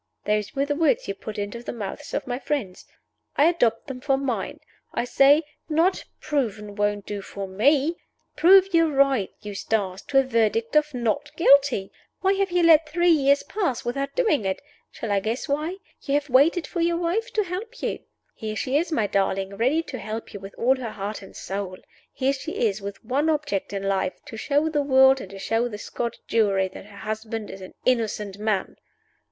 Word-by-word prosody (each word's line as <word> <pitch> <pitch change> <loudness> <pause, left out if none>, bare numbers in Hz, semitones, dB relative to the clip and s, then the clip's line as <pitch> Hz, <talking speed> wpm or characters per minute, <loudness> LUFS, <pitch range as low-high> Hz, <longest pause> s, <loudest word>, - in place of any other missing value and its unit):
Those 210 +2 0
were 275 +1 +1
the 290 - 0
words 310 0 +2
you 195 - -1
put 215 +2 -8
into 205 +3 -4
the - - -5
mouths 205 -5 -6
of - - -2
my 245 0 -3
friends. 245 -10 -3 0.5
I 290 - +5
adopt 245 -10 +2
them 265 -3 -7
for 270 -1 +2
mine! 270 -2 -3 0.4
I - - +1
say 275 +5 +5 0.3
Not 330 +5 +2
Proven 215 -8 -2
won't 205 -1 0
do 205 -1 -4
for 195 0 -6
me. 280 - +2 0.4
Prove 375 +4 +6
your 330 -1 +5
right, 270 -7 +3
Eustace, 200 -2 -2
to 275 - +1
a 270 - +7
verdict 230 -1 0
of 300 0 +4
Not 250 +5 -1
Guilty. 275 - +4 0.3
Why 385 +1 +3
have 395 0 0
you 350 0 +2
let 320 -2 +6
three 345 +2 +3
years 280 -2 +4
pass 360 - -2
without 275 +3 -3
doing 425 - +2
it? 190 -1 -1 0.3
Shall 220 - -5
I 200 - +3
guess 225 +8 -3
why? 305 +6 -1 0.2
You 280 - -1
have 290 -2 -1
waited 320 +7 +4
for 345 - -3
your 340 0 +2
wife 360 +8 -1
to 425 - +2
help 375 +5 -6
you. - - -1 0.3
Here 215 -1 -5
she 260 +5 0
is, 335 +3 -1
my 225 -9 +1
darling, 195 0 0
ready 265 +10 +2
to 260 -6 -7
help 215 +3 -6
you 200 - -6
with 195 +1 -10
all 260 +3 +3
her 245 -3 -4
heart 205 +1 -5
and 195 - -13
soul. 195 -1 -5 0.3
Here 270 +1 0
she 295 +4 -6
is, 210 -3 0
with 200 +2 -7
one 280 +7 +1
object 295 -10 -1
in 200 -1 -3
life 195 -1 0
to 275 -6 -9
show 285 +7 +1
the 300 -2 +1
world 265 -1 +5
and 190 - -8
to 195 - -10
show 225 +4 0
the 210 -3 -6
Scotch 235 +2 -4
Jury 200 -4 +2
that 190 - -11
her 205 -1 -14
husband 220 0 -5
is 195 - -10
an 185 - -11
innocent 210 -5 0
man!" 210 -3 -1
250 Hz, 200 wpm, -24 LUFS, 205-300 Hz, 0.5 s, a